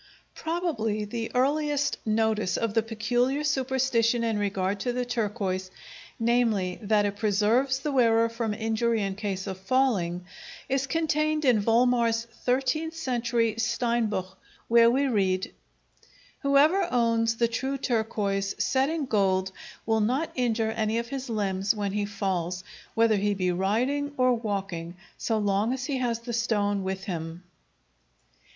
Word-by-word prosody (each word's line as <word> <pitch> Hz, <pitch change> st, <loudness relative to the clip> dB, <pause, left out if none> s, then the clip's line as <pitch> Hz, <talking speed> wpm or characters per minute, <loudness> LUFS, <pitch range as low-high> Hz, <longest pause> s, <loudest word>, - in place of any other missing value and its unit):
Probably 290 Hz, -12 st, -2 dB
the 225 Hz, +2 st, -4 dB
earliest 290 Hz, +2 st, +1 dB
notice 220 Hz, -2 st, +1 dB
of 230 Hz, -2 st, -1 dB
the 225 Hz, -, +3 dB
peculiar 240 Hz, +6 st, 0 dB
superstition 260 Hz, -4 st, +1 dB
in 225 Hz, -2 st, 0 dB
regard 200 Hz, -1 st, -1 dB
to 245 Hz, +4 st, -1 dB
the 250 Hz, 0 st, -1 dB
turquoise—namely, 210 Hz, -1 st, -2 dB
that 210 Hz, -1 st, +2 dB
it 205 Hz, 0 st, -2 dB
preserves 220 Hz, +6 st, +2 dB
the 290 Hz, +2 st, -3 dB
wearer 230 Hz, -3 st, +4 dB
from 230 Hz, -2 st, -3 dB
injury 225 Hz, 0 st, 0 dB
in 195 Hz, -1 st, -2 dB
case 195 Hz, -2 st, -4 dB
of 190 Hz, -2 st, -5 dB
falling—is 255 Hz, -, -1 dB
contained 310 Hz, -1 st, 0 dB
in 245 Hz, -4 st, +5 dB
Volmar's 230 Hz, 0 st, +2 dB
thirteenth 265 Hz, +7 st, -1 dB
century 235 Hz, -6 st, 0 dB
"Steinbuch," 230 Hz, -5 st, -1 dB, 0.3 s
where 230 Hz, 0 st, +6 dB
we 270 Hz, +4 st, +2 dB
read: 190 Hz, -6 st, 0 dB, 0.9 s
Whoever 290 Hz, +7 st, +4 dB
owns 230 Hz, -1 st, +2 dB
the 235 Hz, +1 st, +2 dB
true 265 Hz, +4 st, -2 dB
turquoise 210 Hz, -5 st, -1 dB
set 265 Hz, +1 st, +1 dB
in 320 Hz, -3 st, -2 dB
gold 190 Hz, -5 st, +1 dB, 0.3 s
will 220 Hz, -1 st, +2 dB
not 260 Hz, +9 st, 0 dB
injure 225 Hz, -3 st, 0 dB
any 220 Hz, 0 st, -1 dB
of 235 Hz, 0 st, -3 dB
his 270 Hz, -1 st, -5 dB
limbs 200 Hz, -1 st, 0 dB
when 205 Hz, -2 st, -2 dB
he 205 Hz, +1 st, -1 dB
falls, 185 Hz, -3 st, -2 dB, 0.3 s
whether 225 Hz, -2 st, +4 dB
he 205 Hz, +1 st, 0 dB
be 185 Hz, -2 st, 0 dB
riding 250 Hz, +11 st, 0 dB
or 255 Hz, 0 st, +4 dB
walking, 195 Hz, -7 st, -3 dB, 0.2 s
so 225 Hz, -, 0 dB
long 205 Hz, +2 st, +1 dB
as 260 Hz, 0 st, -3 dB
he 275 Hz, -2 st, -2 dB
has 235 Hz, -2 st, -1 dB
the 240 Hz, 0 st, -6 dB
stone 205 Hz, -4 st, 0 dB
with 190 Hz, 0 st, -3 dB
him. 165 Hz, -2 st, -5 dB
230 Hz, 140 wpm, -27 LUFS, 205-255 Hz, 0.9 s, where